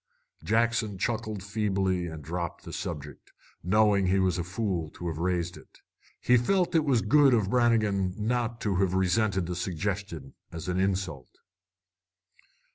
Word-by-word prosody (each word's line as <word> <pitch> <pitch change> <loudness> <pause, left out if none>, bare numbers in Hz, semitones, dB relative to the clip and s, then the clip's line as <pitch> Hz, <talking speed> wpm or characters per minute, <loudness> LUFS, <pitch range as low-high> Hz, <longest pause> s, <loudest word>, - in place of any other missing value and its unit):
Jackson 115 -2 +1
chuckled 110 -1 -2
feebly 95 -3 -1
and 80 -2 -8
dropped 85 +2 -4
the - - -9
subject, 75 -4 -6 0.3
knowing 100 +1 +3
he 95 +2 +3
was 95 -2 +1
a - - -1
fool 90 -3 -2
to 85 - -7
have 80 -2 -4
raised 85 0 -1
it. - - -17 0.4
He 125 - +4
felt 180 +9 +1
it 160 -2 +3
was 125 -6 +2
good 135 +3 +5
of 105 -3 0
Brannigan 110 -6 +2
not 115 +1 -1
to 100 -3 0
have 95 -1 +1
resented 95 0 +1
the 90 +1 -4
suggestion 90 -4 -4 0.2
as 85 0 -7
an 90 0 -1
insult. 95 -8 -2
95 Hz, 150 wpm, -28 LUFS, 90-110 Hz, 0.4 s, good